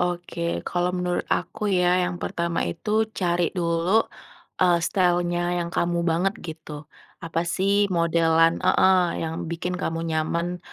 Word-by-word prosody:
Oke, 175 -1 -3 0.2
kalau 175 0 0
menurut 180 0 -2
aku 210 -2 -1
ya, 180 -1 +3
yang 180 - -5
pertama 170 - -2
itu 215 - 0
cari 175 -3 0
dulu, 175 +4 +2 0.6
eee, 175 -2 +4
style-nya 175 -1 +1
yang 170 - -5
kamu 175 0 0
banget 175 +4 +1
gitu. 155 -2 -9 0.3
Apa 165 0 -2
sih 200 +3 +2
modelan 165 -1 +3
heeh, 185 -2 +3
yang 160 0 -4
bikin 170 +2 -3
kamu 165 -3 -2
nyaman 170 +3 -1
175 Hz, 135 wpm, -24 LUFS, 165-180 Hz, 0.6 s, eee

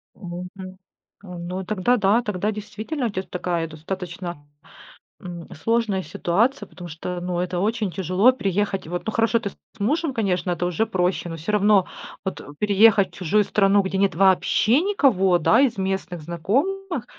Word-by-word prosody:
Мгм. 185 +1 -8 0.4
Ну 180 0 -6
тогда 215 +5 +1
да, 210 +3 +3
тогда 210 -1 -2
действительно 215 +6 -4
у - - -1
тя 190 -1 -3
такая 175 -3 -2
достаточно, 175 -1 -6 0.8
м, 175 -3 -8
сложная 220 +1 0
ситуация. 205 - 0
Потому 175 -1 -10
что, 175 +3 -5
ну, 180 -1 -2
это 180 0 -2
очень 215 -1 0
тяжело- 190 +7 +3
приехать. 195 -5 -1
Вот, 175 +1 -4
ну, 220 - -1
хорошо, 230 +1 +2
ты 210 - -4
с - - -21 0.2
мужем, 290 +7 0
конечно, 190 -5 0
это 175 +1 -1
уже 180 +5 0
проще. 180 -2 -1
Но 165 - -5
всё 165 +7 -3
равно 205 -2 +4 0.4
вот, 190 - -4 0.2
переехать 210 -1 +5
в - - -13
чужую 205 +3 +2
страну, 200 0 +3
где 190 0 -2
нет 195 -3 +2
вообще 195 - +3
никого, 230 - +3
да, 165 - +4
из 250 -6 +2
местных 190 -3 -3
знакомых- 270 - -1
190 Hz, 160 wpm, -23 LUFS, 180-215 Hz, 0.8 s, переехать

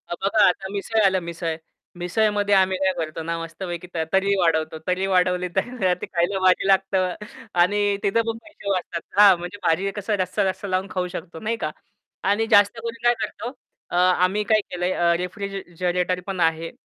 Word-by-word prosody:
बघा 200 +3 +2
आता 190 +1 0
मिसळ 210 +2 -1
आल 190 -1 +3
मिसळ. 165 -1 -3 0.4
मिसळमध्ये 205 +2 +1
आम्ही 190 -1 +3
काय 190 0 +2
करतो 160 -1 -4
ना, 165 +1 -2
मस्तपैकी 175 +1 -6
त - - -5 0.2
तर्री 200 +1 +3
वाढवतो. 160 -2 +1
तर्री 185 +1 0
वाढवली 180 -1 +2
तर 215 -8 0
ते - - -2
खायला 180 +2 0
भारी 185 +1 +3
लागतं 190 -2 +2 0.5
आणि 205 +2 +2
तिथं 215 +3 +2
पण 225 0 -2
पैसे 310 -11 -9
वाचतात. 175 -2 -2 0.2
हां, 195 -4 +8
म्हणजे 175 +4 -7
भारी 165 +3 +2
आहे 195 - -1
कसं 205 +1 -2
जास्त 185 - -1
रस्सा-रस्सा 195 0 0
लावून 185 +1 -1
खाऊ 180 -1 -2
शकतो 165 -2 -7
नाही 225 +4 -2
का? 155 - -1 0.5
आणि 205 +3 +1
जास्त 205 +3 +5
करून 230 0 -6
काय 240 0 +5
करतो, 240 - -4 0.4
अ, - - -4
आम्ही 185 +3 +3
काय 215 0 +3
केलंय 180 +1 -1
अ, 170 0 +2
रेफ्रिज 195 +2 -5 0.3
अ, 180 - +3
...रेटर 180 0 0
पण 195 -2 -4
आहे 165 0 +1
185 Hz, 190 wpm, -23 LUFS, 175-205 Hz, 0.5 s, हां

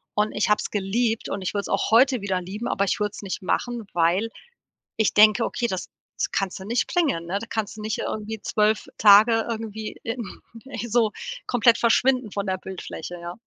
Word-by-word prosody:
Und 210 +1 +1
ich 210 - 0
habe 210 - +4
es - - -4
geliebt 220 +3 -1
und 195 - -3
ich 185 - -2
würde 200 - 0
es - - -8
auch 195 - 0
heute 255 +3 +5
wieder 190 -2 -1
lieben, 200 +6 -5
aber 200 - 0
ich 195 - -1
würde 210 -1 0
es - - -8
nicht 190 - -4
machen, 240 +4 -2
weil 175 +6 +2 0.7
ich 220 - +2
denke: 215 +2 +6
„Okay, 240 - -2
das 185 -4 -4 0.3
das - - -1
kannst 195 -1 -2
du 190 - -9
nicht 235 +3 0
bringen“, 285 - 0
ne? 195 +3 -1
Da 230 - -8
kannst 220 -1 -3
du 215 - -7
nicht 215 +1 -2
irgendwie 215 +1 -4
12 215 0 +1
Tage 220 +2 +7
irgendwie 220 -1 -5
in 235 +1 -3 0.4
ey, 240 -4 -5
so 225 -1 +3 0.4
komplett 235 -1 +4
verschwinden 250 0 +3
von 200 0 -3
der 190 0 0
Bildfläche, 175 -2 -7
ja. 170 0 -6
215 Hz, 210 wpm, -24 LUFS, 195-230 Hz, 0.7 s, Tage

